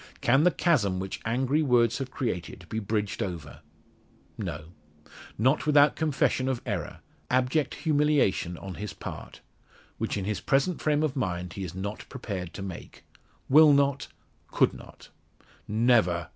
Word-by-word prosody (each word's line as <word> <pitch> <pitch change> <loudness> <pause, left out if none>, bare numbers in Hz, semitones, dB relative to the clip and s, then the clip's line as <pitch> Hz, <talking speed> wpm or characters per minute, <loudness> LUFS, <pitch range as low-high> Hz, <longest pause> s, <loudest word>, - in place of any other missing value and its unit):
Can 135 +5 +3
the - - +7
chasm 115 - +1
which 95 +1 -5
angry 130 +6 +1
words 120 -4 +3
have 135 -1 -4
created 95 - -4
be 110 - -2
bridged 105 -1 -2
over? 80 -6 -5 0.8
No. 80 - -6 0.7
Not 130 +7 +2
without 145 0 +5
confession 140 -4 +1
of 130 -3 -1
error 100 -8 -4 0.3
abject 130 +4 +1
humiliation 145 - +1
on 95 +2 -7
his 105 - -5
part - - -9 0.6
which - - -2
in 95 - -3
his 105 0 -2
present 140 +6 +1
frame 150 0 +1
of 155 -4 -1
mind 90 -7 -3
he 100 - -5
is 90 -1 -6
not 100 +3 -6
prepared 100 -9 -5
to 95 - -6
make 95 -3 -9 0.4
will 150 +2 +7
not 140 -1 +2 0.4
could - - +2
not. - - -13 0.6
"Never!" 105 -7 +2
120 Hz, 145 wpm, -27 LUFS, 95-140 Hz, 0.8 s, the